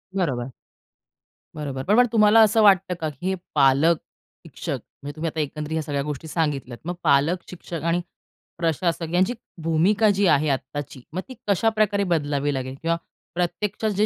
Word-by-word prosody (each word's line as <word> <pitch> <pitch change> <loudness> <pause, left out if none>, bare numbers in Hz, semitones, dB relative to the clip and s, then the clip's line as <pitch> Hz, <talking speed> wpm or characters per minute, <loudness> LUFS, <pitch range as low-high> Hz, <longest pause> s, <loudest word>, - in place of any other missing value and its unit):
बरोबर. 135 -9 -1 1.0
बरोबर. 140 -3 -4
पण 200 +7 +3
मग 245 +1 +6
तुम्हाला 215 -1 +6
असं 220 +1 +5
वाटतं 195 -3 +5
का, 155 - -1
की 150 +5 -7
हे 190 - +1 0.2
पालक, 145 +4 +5 0.5
शिक्षक - - -5 0.2
म्हणजे 145 +1 -6
तुम्ही 160 +1 -3
आता 160 - -6
एकंदरीत 150 +1 -3
ह्या 160 - 0
सगळ्या 145 -1 -2
गोष्टी 150 +1 -5
सांगितल्यात. 145 -6 -2
मग 175 - -2
पालक, 145 +6 +3
शिक्षक 170 -3 -7
आणि 170 +1 +1 0.6
प्रशासक 165 0 -1
यांची 185 +6 +3 0.3
भूमिका 185 +7 +3
जी 200 +1 +2
आहे 150 -2 +3
आत्ताची, 135 0 -4
मग 185 - -2
ती - - -7
कशाप्रकारे 210 0 +2
बदलावी 145 -2 0
लागेल 130 0 -4
किंवा 165 +1 +1 0.4
प्रत्यक्षात 185 +5 -1
जे 210 - +4
165 Hz, 160 wpm, -24 LUFS, 145-190 Hz, 1.0 s, मग